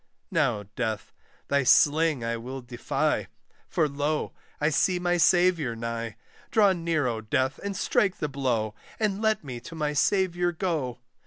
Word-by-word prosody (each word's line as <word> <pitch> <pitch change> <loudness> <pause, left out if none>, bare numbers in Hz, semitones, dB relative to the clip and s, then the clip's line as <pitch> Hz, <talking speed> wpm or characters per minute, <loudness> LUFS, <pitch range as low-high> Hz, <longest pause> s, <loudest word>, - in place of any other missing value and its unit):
Now, 135 - +1
Death, 110 -3 -3 0.3
thy 140 0 +2
sling 150 0 +4
I 115 0 -1
will 130 +3 -6
defy! 120 -1 -1 0.4
For, 155 - +1
lo, 145 +2 -2 0.3
I 150 - +2
see 180 +4 +2
my 175 0 +1
Saviour 175 -7 +3
nigh 115 -1 -4 0.3
Draw 205 -3 +5
near, 165 -4 0
O 115 -3 -1
Death, 130 +5 0
and 200 -1 -3
strike 200 -5 +1
the 150 - -2
blow, 125 -6 -1 0.3
And 210 -2 0
let 220 -1 +1
me 125 -4 -6
to 165 +7 -10
my 150 -2 -1
Saviour 175 +3 +2
go. 160 -8 -2
150 Hz, 155 wpm, -27 LUFS, 120-175 Hz, 0.4 s, Draw